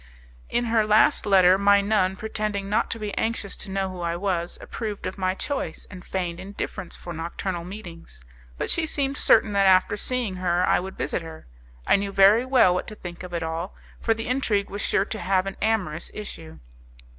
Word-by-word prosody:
In 240 Hz, -, 0 dB
her 225 Hz, -1 st, +3 dB
last 215 Hz, 0 st, +4 dB
letter, 190 Hz, -1 st, +6 dB
my 200 Hz, 0 st, +5 dB
nun, 200 Hz, -2 st, +1 dB
pretending 210 Hz, -1 st, -3 dB
not 210 Hz, +2 st, +1 dB
to -, -, -3 dB
be 210 Hz, -2 st, -5 dB
anxious 225 Hz, -3 st, -2 dB
to 205 Hz, -, -7 dB
know 190 Hz, 0 st, -2 dB
who 180 Hz, -1 st, -7 dB
I 170 Hz, 0 st, -1 dB
was, 175 Hz, -2 st, -2 dB
approved 215 Hz, -4 st, -5 dB
of 185 Hz, -, -3 dB
my 185 Hz, 0 st, 0 dB
choice, 285 Hz, +7 st, -4 dB
and 185 Hz, -2 st, -10 dB
feigned 175 Hz, -3 st, -3 dB
indifference 195 Hz, -2 st, -6 dB
for 175 Hz, -, -8 dB
nocturnal 170 Hz, +2 st, -4 dB
meetings; 170 Hz, -, -10 dB, 0.3 s
but -, -, -1 dB
she 325 Hz, -1 st, +1 dB
seemed 275 Hz, -2 st, -1 dB
certain 220 Hz, -2 st, +4 dB
that 200 Hz, -1 st, +4 dB
after 185 Hz, +2 st, +4 dB
seeing 235 Hz, -4 st, -2 dB
her 180 Hz, 0 st, +1 dB
I -, -, +3 dB
would 190 Hz, +1 st, -7 dB
visit -, -, -2 dB
her. 160 Hz, -1 st, -10 dB, 0.4 s
I -, -, +5 dB
knew 200 Hz, 0 st, -3 dB
very 200 Hz, +5 st, +6 dB
well 255 Hz, -9 st, +5 dB
what 180 Hz, -, -2 dB
to 215 Hz, -, -7 dB
think 175 Hz, -3 st, -8 dB
of 180 Hz, -1 st, -8 dB
it 170 Hz, -1 st, -2 dB
all, 165 Hz, +3 st, -4 dB, 0.2 s
for 225 Hz, -, +1 dB
the 225 Hz, 0 st, -5 dB
intrigue 230 Hz, -6 st, 0 dB
was 205 Hz, +1 st, -4 dB
sure 195 Hz, -, +2 dB
to 220 Hz, -, -5 dB
have 190 Hz, -1 st, +1 dB
an 195 Hz, -, -4 dB
amorous 190 Hz, -8 st, -1 dB
issue. 165 Hz, -6 st, -8 dB
195 Hz, 200 wpm, -25 LUFS, 180-215 Hz, 0.4 s, letter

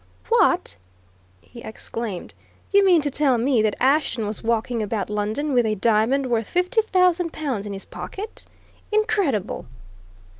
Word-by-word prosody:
"What!" -, -, +2 dB, 0.6 s
he 235 Hz, -, -13 dB
exclaimed. 220 Hz, -3 st, -6 dB, 0.4 s
"You 400 Hz, 0 st, +5 dB
mean 360 Hz, -4 st, +5 dB
to 290 Hz, -1 st, -2 dB
tell 270 Hz, -3 st, +2 dB
me 240 Hz, 0 st, +2 dB
that 215 Hz, -1 st, +1 dB
Ashton 265 Hz, -4 st, +2 dB
was 210 Hz, +1 st, -4 dB
walking 230 Hz, +1 st, 0 dB
about 210 Hz, 0 st, -3 dB
London 215 Hz, +8 st, -1 dB
with 245 Hz, -1 st, +4 dB
a 215 Hz, -, 0 dB
diamond 230 Hz, +6 st, +2 dB
worth 230 Hz, -3 st, 0 dB
fifty 365 Hz, +6 st, +1 dB
thousand 365 Hz, -5 st, +2 dB
pounds 255 Hz, -10 st, -3 dB
in 200 Hz, -, -5 dB
his 195 Hz, -, -7 dB
pocket? 420 Hz, +3 st, -8 dB, 0.4 s
Incredible!" 400 Hz, -, 0 dB
250 Hz, 145 wpm, -23 LUFS, 215-335 Hz, 0.6 s, You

